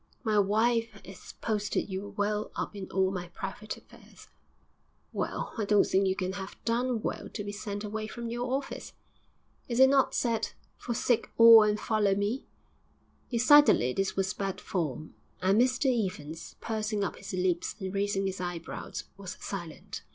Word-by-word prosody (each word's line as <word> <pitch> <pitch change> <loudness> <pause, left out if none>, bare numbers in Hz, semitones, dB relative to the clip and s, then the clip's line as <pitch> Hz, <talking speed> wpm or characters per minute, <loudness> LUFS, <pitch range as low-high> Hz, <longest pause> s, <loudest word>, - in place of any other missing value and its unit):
'My 215 -3 +3
wife 220 +2 +2
'as 190 -1 -11
posted 210 -2 -1
you 200 +1 -6
well 210 +1 0
up - - -4
in 195 -2 -6
all 190 0 +2
my 180 -2 -4
private 200 +3 -6
affairs.' - - -17 0.8
'Well, - - -3
I 215 - +1
don't 205 0 +4
think 195 +1 +2
you 190 - +1
can 185 -1 -2
have 190 0 -7
done 235 0 0
well - - -3
to 205 - -5
be 205 - -4
sent 205 0 -5
away 215 +1 -4
from 235 +1 -6
your 245 +1 -2
office.' 270 +1 -3 0.8
'Is 235 0 0
it 265 0 +8
not 275 -1 +3
said: 230 -2 0 0.2
"Forsake 240 -1 0
all 230 -1 +10
and 210 0 +2
follow 210 -3 +2
me"?' 205 +6 -2 0.8
Decidedly 250 - +6
this 195 +5 -1
was 190 -1 0
bad 195 -1 -3
form, 155 -5 -3 0.3
and 195 +5 +4
Mr 255 +2 +2 0.2
Evans, 160 -1 -9
pursing 215 -2 -2
up 195 - -3
his - - -8
lips 180 -1 0
and 190 -1 -4
raising 200 0 0
his 190 -1 -3
eyebrows, 175 -2 -5
was 195 -3 -7
silent. 190 +1 -6
205 Hz, 165 wpm, -29 LUFS, 190-225 Hz, 0.8 s, all